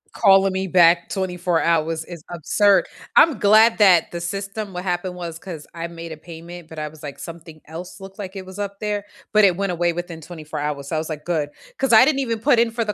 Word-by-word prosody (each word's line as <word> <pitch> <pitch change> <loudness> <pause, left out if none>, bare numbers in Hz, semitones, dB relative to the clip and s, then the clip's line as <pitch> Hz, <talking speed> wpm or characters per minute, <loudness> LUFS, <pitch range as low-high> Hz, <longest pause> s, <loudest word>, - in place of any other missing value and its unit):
Calling 195 -2 +5
me 190 0 -2
back 170 -1 +4
24 180 -2 -1
hours 160 -1 0
is 170 -3 -10
absurd. 200 +4 +3 0.3
I'm 310 -8 +6
glad 215 +2 +5
that 180 -5 +5
the 170 - -4
system 195 +3 -4
what 180 0 -6
happened 180 0 -2
was, 170 -2 -6
'cause 165 -4 -9
I 170 0 -5
made 165 -1 -8
a - - -10
payment, 170 +1 -11
but, 160 -1 -8
I 150 - -3
was, 150 0 -14
like, 140 -2 -8
something 165 -2 -10
else 170 +5 -9
looked 195 0 -11
like 195 -1 -7
it 190 - -7
was 190 +1 -11
up 200 -1 -5
there, 210 -1 -2 0.3
but, 215 0 +5
it 185 -2 +4
went 195 -2 -1
away 175 0 +1
within 170 -1 -6
24 155 -2 -8
hours, 145 -1 -3
so 160 - -3
I - - +1
was, 160 - -5
like, 150 -1 -6
"Good," 155 -4 -1 0.3
'cause 270 -2 0
I 225 +3 +8
didn't 280 -2 +1
even 230 -4 -1
put 245 0 +3
in 230 -1 +2
for 230 0 -2
the 210 - -2
175 Hz, 240 wpm, -22 LUFS, 165-200 Hz, 0.3 s, I